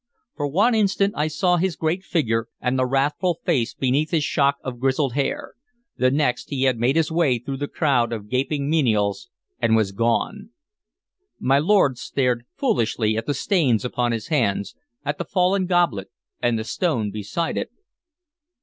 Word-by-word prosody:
For 145 - -2
one 205 - +3
instant 200 -2 +2
I 150 +1 0
saw 175 +4 +1
his 180 -1 0
great 165 +4 -1
figure, 115 - 0
and 125 +1 -1
the 130 - +2
wrathful 145 +6 0
face 135 - 0
beneath 140 +4 +1
his 160 -3 +1
shock 140 -1 +2
of 125 -2 -6
grizzled 135 0 +1
hair; 140 +1 -2 0.4
the 130 - +2
next 135 -2 0
he 135 -2 -1
had 130 -3 +2
made 125 +4 +2
his 165 -1 +1
way 160 -7 +2
through 135 +4 -5
the 145 +1 -3
crowd 130 -8 +1
of 105 -3 -5
gaping 140 +4 -1
menials 120 -7 +1 0.3
and 115 -1 +3
was 110 -3 +1
gone. 120 - -1 0.9
My 135 +2 +3
lord 150 -7 +3
stared 125 -3 -1
foolishly 115 - +1
at 110 +1 -3
the 145 - 0
stains 140 - +1
upon 125 -1 0
his 115 +3 -4
hands, 115 -10 0 0.3
at - - -2
the - - -1
fallen 185 0 +1
goblet 175 - +1 0.3
and 120 -1 +1
the 110 - -3
stone 115 - -1
beside 110 - -3
it. - - -3
135 Hz, 170 wpm, -23 LUFS, 120-165 Hz, 0.9 s, one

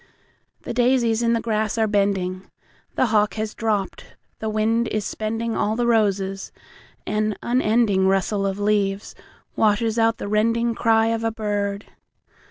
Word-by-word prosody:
The - - -5
daisies 240 -2 +2
in 235 0 +2
the 230 - 0
grass 220 -1 -1
are 220 - +3
bending, 195 -3 -1 0.5
The - - +2
hawk 210 0 +2
has 215 -1 -3
dropped, 210 -4 -3 0.2
the 220 - -3
wind 220 +2 +1
is 215 -2 -2
spendingAll 220 0 -2
the 240 - +1
roses, 195 -4 0 0.5
and 215 0 -1
unendingRustle 205 -4 +1
of 195 - -5
leaves 205 -1 0 0.4
washes 220 +1 +1
out 225 0 +2
the - - -6
rendingCry 225 +1 +2
of 225 0 -3
a 225 - +1
bird. 205 -2 -3
215 Hz, 135 wpm, -22 LUFS, 205-225 Hz, 0.5 s, are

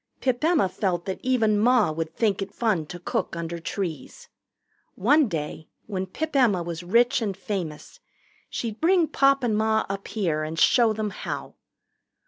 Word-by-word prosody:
Pip 255 +1 -1
Emma 320 - +3
felt 180 -2 -2
that 190 - -4
even 225 -5 +2
Ma 235 -4 +4
would 160 +1 -4
think 205 -4 +1
it 195 0 -4
fun 205 -10 0
to 175 - -7
cook 175 - -3
under 170 0 -4
trees. 165 -4 -5 0.7
One 285 +8 +4
day 155 -3 -5 0.2
when 190 -2 -3
Pip 310 +10 -4
Emma 215 -10 +3
was 170 -1 -5
rich 235 +7 +3
and 200 -4 -2
famous, 180 -7 -5 0.5
she'd 225 -2 -4
bring 345 +1 +4
Pop 275 -1 +3
and 225 -3 +1
Ma 220 0 +2
up 195 0 -4
here 170 -8 -1
and 155 +1 -5
show 230 +8 +5
them 215 -1 -2
how. - - -6
205 Hz, 165 wpm, -25 LUFS, 175-240 Hz, 0.7 s, show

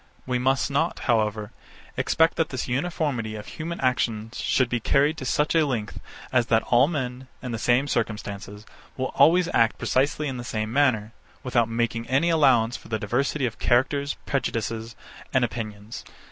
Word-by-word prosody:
66. - - -33
We 125 -1 0
must 135 +2 +1
not, 160 +5 0
however, 110 -3 0 0.4
expect 160 0 +2
that 165 - 0
this 130 -1 -4
uniformity 130 -5 -2
of 105 - -7
human 170 +2 -6
actions 115 -4 -1
should 130 - +2
be 120 0 -1
carried 140 +7 +2
to 130 - -6
such 150 +4 +1
a 165 -1 +4
length 120 -8 -3 0.3
as 120 -2 +3
that 115 -2 +3
all 125 +3 +6
men, 130 -5 -4 0.2
in 125 - -4
the 115 - -3
same 125 +5 +2
circumstances, 105 -3 -4 0.3
will 130 0 -2
always 175 +3 +5
act 115 -1 +3
precisely 145 +3 0
in 130 -2 -4
the 120 - -6
same 110 -2 -3
manner, 125 -7 +2 0.3
without 120 -3 +1
making 115 0 -1
any 140 +7 +2
allowance 130 -7 +4
for - - -10
the 110 - -1
diversity 135 +7 -1
of 115 - -4
characters, 140 +4 +1
prejudices, 115 -3 -2 0.4
and 130 -2 +4
opinions. 110 -2 -7
125 Hz, 175 wpm, -25 LUFS, 115-140 Hz, 0.4 s, all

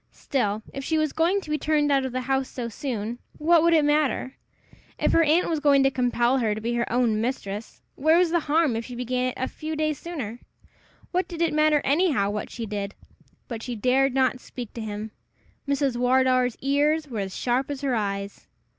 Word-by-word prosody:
Still, 215 -5 -1
if 275 - -5
she 320 +3 0
was 310 -2 0
going 355 +5 +2
to 310 - -12
be 305 - 0
turned 295 0 +1
out 270 -1 +3
of - - -7
the 255 +1 -2
house 265 +1 -1
so 240 -2 -5
soon, 235 -1 -4 0.2
what 330 +2 +4
would 335 0 +4
it 305 -2 +4
matter? 295 -3 +1 0.6
If - - +1
her 330 - +5
aunt 325 +3 +3
was 320 -2 0
going 285 -2 +4
to 270 - +3
compel 245 0 +1
her 220 -3 +1
to - - -4
be 235 +2 -2
her 235 0 -1
own 235 -3 +2
mistress, 220 -3 -4
where 315 +4 +3
was 350 -2 +3
the 345 - +3
harm 305 -4 +2
if 225 - -2
she 245 +1 -8
began 250 +1 -1
it 255 - -2
a 260 - -1
few 310 0 -5
days 310 -2 -1
sooner? 255 -10 -6 0.7
What 365 +1 0
did 340 -2 -7
it 335 -2 +1
matter 305 -1 +3
anyhow 280 - +2
what 210 0 -4
she 235 - -5
did? 205 -1 -4 0.5
But 230 -3 -5
she 245 +1 -5
dared 255 +4 +2
not 260 -1 +2
speak 245 -2 -8
to 230 - -6
him! 215 0 -5 0.6
Mrs. 280 -3 0
Wardour's 255 0 +2
ears 295 +3 +1
were 235 -6 -5
as 190 -1 -4
sharp 255 +3 0
as 285 -1 -4
her 275 -3 0
eyes. 200 -2 -3
260 Hz, 215 wpm, -25 LUFS, 235-305 Hz, 0.7 s, her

